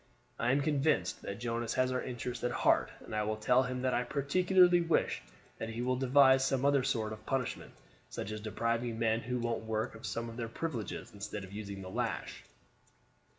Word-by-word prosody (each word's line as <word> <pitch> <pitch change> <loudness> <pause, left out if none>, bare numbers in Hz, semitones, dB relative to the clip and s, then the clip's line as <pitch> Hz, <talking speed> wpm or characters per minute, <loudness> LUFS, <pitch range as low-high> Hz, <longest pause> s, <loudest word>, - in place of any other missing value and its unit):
I 120 +1 +2
am 140 +2 +3
convinced 140 - +1
that 100 - -5
Jonas 115 -1 -2
has 130 0 +2
our 130 - 0
interests 120 -1 -5
at 125 - +2
heart, - - +3 0.2
and - - -6
I 105 - +1
will 110 +1 -1
tell 125 +4 +4
him 125 0 -3
that 130 - +1
I 120 - +2
particularly 175 +7 +4
wish 165 - +1 0.4
that 110 - -4
he 115 +2 -3
will 130 +1 +1
devise 130 +1 +5
some 135 0 +1
other 140 -1 +4
sort 115 -5 -1
of 110 - -10
punishment, 135 -3 -2 0.4
such 105 - -5
as 110 0 -5
depriving 115 +2 -1
men 115 0 +2
who 125 +2 -3
won't 120 -1 -1
work 110 0 -1
of 110 - -7
some 115 0 -3
of 115 0 -8
their 115 -2 -3
privileges 125 -4 -4
instead 105 0 -5
of 95 0 -10
using 100 -2 -6
the 95 - -8
lash." - - -3
120 Hz, 200 wpm, -32 LUFS, 110-130 Hz, 0.4 s, devise